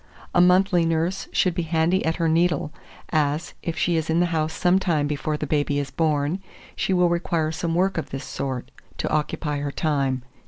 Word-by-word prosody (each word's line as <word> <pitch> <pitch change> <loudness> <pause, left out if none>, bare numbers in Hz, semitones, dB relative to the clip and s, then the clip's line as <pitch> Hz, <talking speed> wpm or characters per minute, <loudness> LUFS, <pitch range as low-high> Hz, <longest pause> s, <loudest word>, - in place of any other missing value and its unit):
A 175 - +5
monthly 180 0 +4
nurse 165 +4 0
should 185 - +2
be 175 - -1
handy 165 +3 +1
at 160 +1 0
her 165 -2 0
needle, 160 -2 +1 0.4
as, 155 +1 0
if 165 -1 -4
she 170 -2 +1
is 160 0 -2
in 160 +1 +2
the 175 - +4
house 155 -1 0
some 180 +3 +2
time 160 -6 +1
before 150 +1 -2
the 150 - -3
baby 145 -1 0
is 140 -1 -2
born, 155 +3 0 0.3
she - - -1
will 180 -1 +4
require 170 -2 0
some 165 +1 -2
work 185 0 +1
of - - -6
this 135 0 -5
sort; 130 -2 -4 0.3
to - - -2
occupy 150 -1 -1
her 145 0 -3
time. 140 -5 0
160 Hz, 200 wpm, -24 LUFS, 150-175 Hz, 0.4 s, A